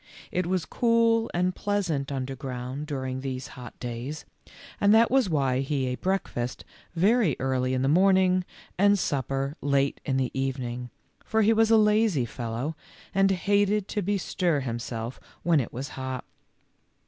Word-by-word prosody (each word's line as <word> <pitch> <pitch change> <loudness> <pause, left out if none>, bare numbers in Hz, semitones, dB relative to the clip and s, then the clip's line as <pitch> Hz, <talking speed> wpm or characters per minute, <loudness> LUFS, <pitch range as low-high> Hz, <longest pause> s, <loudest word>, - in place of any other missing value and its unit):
It 180 -1 -1
was 180 -2 0
cool 230 -1 +2
and 180 +1 +1
pleasant 175 -9 -1
underground 130 +1 -4
during 130 -3 -3
these 130 -1 -4
hot 125 -2 -11
days, 125 +5 -5 0.5
and 205 +2 +5
that 230 +1 +5
was 260 -6 +3
why 135 -5 +1
he 135 0 -1
ate 125 0 -3
break 190 +1 0
fast 120 +1 -4 0.3
very 195 - +3
early 130 -1 0
in 130 - 0
the - - +2
morning 185 +3 +4 0.4
and 205 +1 +5
supper 135 -3 -1
late 140 -1 +1
in 135 -2 0
the 130 -1 0
evening, 125 -2 -3 0.3
for 220 0 +1
he 220 +2 +5
was 225 0 +3
a 225 - +6
lazy 210 - +3
fellow, 120 +6 -4 0.4
and 195 0 +4
hated 205 +2 +2
to 210 - -1
bestir 180 -5 0
himself 115 -1 -4 0.2
when 170 -3 +4
it 125 - -3
was 130 +3 -5
hot. 130 -1 -5
145 Hz, 155 wpm, -27 LUFS, 130-195 Hz, 0.5 s, a